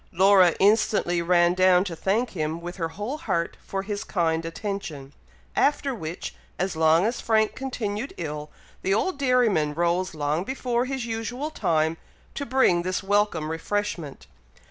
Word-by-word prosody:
Laura 190 -1 +5
instantly 200 -4 +3
ran 175 0 +4
down 185 0 +5
to 180 -4 -5
thank 215 +8 0
him 160 -1 -2
with 175 +2 -7
her 165 -3 -1
whole 210 - -5
heart 170 - -1
for 195 0 -4
his 205 0 -4
kind 165 -3 0
attention, 165 -7 -5 0.4
after 285 -1 +2
which, 170 -6 -6 0.2
as 190 -1 -1
long 160 +3 +4
as 235 +3 -1
Frank 220 -1 +2
continued 245 -2 -4
ill, 150 -2 -5 0.3
the 195 +1 +1
old 330 - -1
dairyman 230 - +2
rose 175 +1 0
long 150 +3 -1
before 250 0 -1
his 265 -2 -3
usual 235 +6 -4
time, 160 - +1 0.4
to 280 - -4
bring 240 -9 +3
this 185 +2 -2
welcome 195 -6 +1
refreshment. 165 -3 -3
190 Hz, 150 wpm, -25 LUFS, 165-225 Hz, 0.4 s, Laura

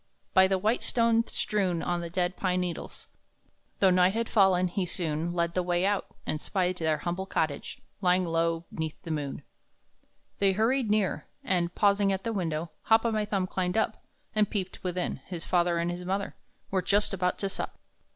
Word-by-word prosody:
By 190 0 +7
the 190 0 +2
white 215 +5 +1
stones 230 -1 +2
strewn 185 -5 0
on 175 0 -1
the 170 - -5
dead 180 +1 0
pine 185 -1 0
needles, 180 -2 -5 0.7
Though 190 -2 +5
night 180 +2 +4
had 230 0 0
fallen, 190 -4 +4
he 185 +2 -1
soon 165 -2 -2
Led 170 -1 0
the 180 - +1
way 175 +1 +1
out, 200 0 +1 0.2
and 155 - -2
spied 185 -2 0
their 160 -2 +1
humble 175 +5 -3
cottage, 155 -6 -2 0.2
Low 180 - +3
lying 165 -2 +2
'neath 160 -1 -4
the 165 - -5
moon. 145 -2 -3 1.0
They 195 -1 +4
hurried 230 +3 +1
near, 210 -2 +1 0.2
and, 175 -2 0
pausing 200 -1 +3
at 190 0 -2
the 230 - -2
window, 165 -4 -2
Hop 225 +1 +5
o'my 215 -2 +1
Thumb 195 -3 0
climbed 185 +1 -1
up, 220 - 0 0.3
And 215 -1 +2
peeped 190 -3 -4
within; 180 -1 -2
his 175 -3 -5
father 175 -1 +2
and 170 +1 0
his 175 +1 -5
mother 195 +2 -2 0.4
Were 190 -1 +2
just 205 +2 +1
about 180 -1 0
to 200 - -2
sup. 195 - -5
185 Hz, 185 wpm, -28 LUFS, 175-200 Hz, 1.0 s, By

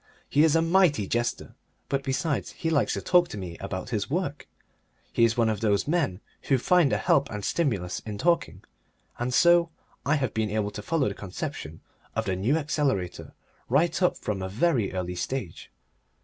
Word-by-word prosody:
He 145 - +3
is 160 -1 +4
a 165 - +4
mighty 165 - +3
jester, 120 +4 -2 0.3
but, 140 -1 0
besides, 135 +2 -1
he 165 - -2
likes 145 - +2
to - - -3
talk 175 -1 +4
to 105 - -7
me 90 -4 -6
about 100 +3 -5
his 105 -1 -1
work; 150 -2 -2 0.7
he 115 - +3
is 115 +1 0
one 115 -1 +3
of 110 -2 0
those 105 +1 +1
men 145 - 0 0.3
who 135 - +5
find 165 +2 +3
a - - +2
help 140 0 +2
and 105 -2 -5
stimulus 105 - -1
in 105 -2 -7
talking, 170 +8 0 0.6
and 120 +1 -1
so 170 +4 +5 0.3
I 140 +4 +2
have 130 -6 -1
been 110 -1 0
able 105 0 -1
to 105 - -7
follow 155 +5 0
the 100 - -2
conception 95 -2 -6 0.3
of - - -1
the 95 - 0
New 115 +12 +1
Accelerator 140 - -2 0.4
right 160 +8 +2
up 180 - +2
from 100 -3 -3
a 95 - -3
very 115 - +1
early 90 -1 -3
stage. 90 -1 -4
125 Hz, 190 wpm, -27 LUFS, 100-160 Hz, 0.7 s, who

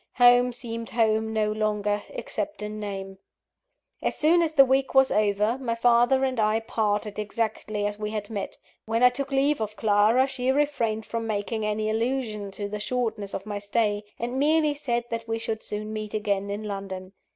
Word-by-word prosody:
Home 245 0 +6
seemed 230 -1 -6
home 220 -1 +1
no 215 -1 +1
longer, 210 -1 0
except 305 - -4
in 210 0 -5
name. 195 -2 -6 0.8
As - - -1
soon 330 +3 +4
as 325 -2 0
the 275 -3 +7
week 265 +1 +1
was 265 0 +6
over, 210 +3 +2
my 235 -3 -2
father 240 +3 +4
and 260 -3 0
I 215 +1 +3
parted 210 -2 -1
exactly 215 -1 -2
as 205 0 -3
we 210 0 -2
had 215 0 -4
met. 205 -2 -4 0.3
When 225 +2 0
I 250 - +9
took 275 +2 -3
leave 275 -1 +2
of 215 -1 -3
Clara, 215 +4 +4
she 260 -1 0
refrained 250 -7 0
from 230 -1 -3
making 215 +1 -2
any 215 0 -1
allusion 220 -2 -1
to 200 +1 -4
the 210 +1 -5
shortness 220 -3 -2
of 195 - -5
my 205 -1 -4
stay; 205 0 0
and 245 +3 -3
merely 305 +1 +3
said 240 -5 -1
that 230 0 -4
we 225 0 -1
should 225 -1 -3
soon 215 +1 -5
meet 215 -1 -5
again 200 -2 -1
in 205 +2 -4
London. 195 -2 -6
220 Hz, 185 wpm, -26 LUFS, 210-245 Hz, 0.8 s, I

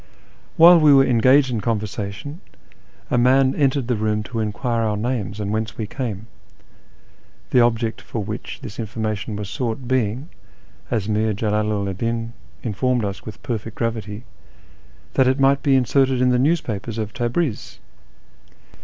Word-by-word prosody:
While 170 +1 +9
we 155 -2 +6
were 135 -1 +6
engaged 130 +3 +4
in 115 -3 -2
conversation, 105 - -4 0.7
a 125 - +3
man 130 +2 +4
entered 135 -3 +1
the 125 - +1
room 105 0 -1
to 115 +1 -5
enquire 115 +2 -1
our 105 -2 0
names 110 -3 -3
and 100 -1 -2
whence 110 0 -3
we 110 - -2
came, 110 -3 -5 1.3
the 125 - +5
object 115 -1 +1
for 110 - -5
which 105 +3 -6
this 110 -2 -8
information 110 -2 -3
was 105 -1 -5
sought 120 +3 -4
being, 130 +3 -1 0.6
as 110 -4 -1
Mir 110 0 0
Jalalu 105 -1 -1
'd 95 - -13
Din 115 0 -2 0.3
informed 120 +1 0
us 100 +2 -6
with 110 - -9
perfect 115 -1 -4
gravity, 110 -2 -3 0.9
that 130 - +3
it 130 +2 +2
might 135 +1 +4
be 140 -2 +3
inserted 130 0 +2
in 125 0 +3
the 125 0 +2
newspapers 120 - -1
of 110 -1 -4
Tabriz 120 +2 -2
115 Hz, 155 wpm, -21 LUFS, 105-130 Hz, 1.3 s, While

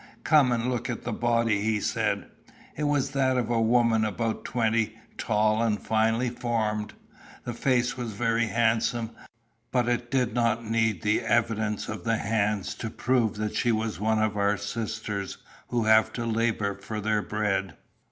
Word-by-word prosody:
"Come 145 -5 +5
and 120 -1 0
look 125 -2 -2
at 120 - -4
the 120 - -3
body," 115 -3 +1
he 110 0 +1
said. - - -1 0.5
It 150 - -2
was 145 -2 +1
that 130 -2 +1
of 120 -1 -1
a 115 -1 +2
woman 115 -1 +3
about 110 +1 -2
twenty, 115 -2 0 0.2
tall, 110 0 +1
and 110 -3 +1
finely 115 +2 +1
formed. 110 -3 -2 0.5
The 120 - -4
face 125 +1 +1
was 120 -3 -4
very 115 +2 +1
handsome, 115 0 +1 0.6
but 125 -2 +1
it 120 0 -1
did 125 -4 +1
not 115 -1 +1
need 110 -4 0
the 105 0 +2
evidence 110 -3 0
of 110 -5 -5
the 115 +2 +1
hands 105 -2 0
to 110 - -3
prove 120 -2 +1
that 105 0 -3
she 120 - +2
was 110 -2 -1
one 110 +1 +1
of 110 -1 +1
our 100 0 +2
sisters 105 -1 -4 0.3
who 120 -2 0
have 110 0 +5
to 120 - -3
labour 115 -3 0
for 105 +2 -5
their 105 0 +1
bread. 100 -5 -1
115 Hz, 170 wpm, -27 LUFS, 110-120 Hz, 0.6 s, Come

